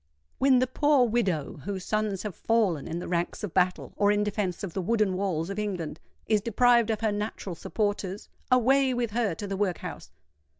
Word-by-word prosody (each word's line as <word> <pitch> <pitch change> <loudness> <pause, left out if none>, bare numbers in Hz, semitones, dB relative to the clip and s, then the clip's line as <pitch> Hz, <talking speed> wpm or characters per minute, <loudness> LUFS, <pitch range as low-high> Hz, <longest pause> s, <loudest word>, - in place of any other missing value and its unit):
When 265 -1 +5
the 255 - +3
poor 270 0 +3
widow, 195 -10 -1
whose 195 -2 -4
sons 215 -3 -1
have 210 -3 -4
fallen 205 -10 +1
in 165 - -3
the 175 - -5
ranks 175 +4 -2
of 205 - -4
battle 180 -1 +1
or 205 0 +3
in 210 0 +2
defence 205 -3 -2
of 185 -4 -4
the 190 - -2
wooden 215 0 +1
walls 185 -2 -1
of 200 - -4
England, 180 -7 -3 0.3
is 215 -2 +2
deprived 235 +1 +3
of 220 -1 -1
her 220 -2 +1
natural 205 -2 -4
supporters, 205 +1 -3 0.2
away 260 +1 +4
with 240 -3 -1
her 220 -6 0
to 205 - -6
the 195 -1 -3
workhouse! 190 -3 -3
205 Hz, 195 wpm, -27 LUFS, 185-230 Hz, 0.3 s, When